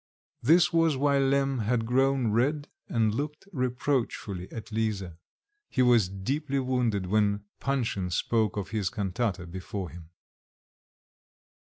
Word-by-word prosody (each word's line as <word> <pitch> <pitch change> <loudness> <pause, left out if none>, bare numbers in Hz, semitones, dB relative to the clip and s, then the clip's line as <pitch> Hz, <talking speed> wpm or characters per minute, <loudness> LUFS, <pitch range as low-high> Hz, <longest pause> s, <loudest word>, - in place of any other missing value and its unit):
This 160 +5 +5
was 165 -4 +3
why 140 0 +3
Lemm 135 -1 +2
had 115 +1 0
grown 130 -1 +2
red, 145 +7 +1 0.2
and 110 -3 +1
looked 150 - -4
reproachfully 125 - -2
at 115 0 -8
Lisa; 100 -6 -2 0.5
he 130 - +2
was 120 -6 +4
deeply 135 +9 -2
wounded 125 -7 0
when 105 +1 +1
Panshin 115 -9 -1
spoke 110 +3 0
of 100 - -3
his 105 -4 -1
cantata 100 -3 -2
before 95 +1 -6
him. 85 -2 -12
115 Hz, 125 wpm, -28 LUFS, 100-135 Hz, 0.5 s, This